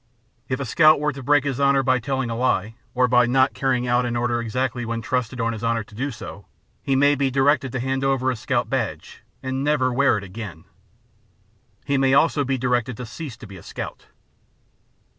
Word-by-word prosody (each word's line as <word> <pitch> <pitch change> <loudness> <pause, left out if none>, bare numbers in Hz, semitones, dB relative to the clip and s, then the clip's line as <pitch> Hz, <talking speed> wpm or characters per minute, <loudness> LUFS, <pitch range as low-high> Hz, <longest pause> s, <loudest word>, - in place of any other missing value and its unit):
If 130 - -1
a 140 - -3
scout 155 +5 +5
were 150 0 0
to 135 - -8
break 145 +2 +3
his 140 -3 -2
honor 140 -1 +3
by 130 0 +2
telling 130 -1 -2
a - - -2
lie, 115 -4 0 0.2
or 125 0 +3
by 125 0 +4
not 130 +2 +3
carrying 130 -2 0
out 120 +1 +2
an 120 -1 -2
order 120 0 0
exactly 125 +2 -2
when 115 0 -3
trusted 125 0 -2
on 115 0 0
his 110 0 -7
honor 115 -1 0
to 110 - -20
do 130 +7 -3
so, 105 -4 -9 0.3
he 135 - 0
may 145 +2 +4
be 140 -1 +1
directed 135 0 +2
to 130 - -2
hand 130 +2 -1
over 135 -1 +1
his 120 - -5
scout - - 0
badge, - - -4 0.2
and 130 +1 -2
never 145 -3 +2
to - - -3
wear 140 -3 +3
it 100 - -6
again. 95 -4 -8 1.2
He 140 -1 +1
may 135 0 +3
also 150 -1 +3
be 135 0 -1
directed 125 -2 -1
to 125 - -6
cease 130 0 -8
to 120 - -11
be 100 -2 -11
a - - -12
scout. - - -7
130 Hz, 215 wpm, -23 LUFS, 120-135 Hz, 1.2 s, scout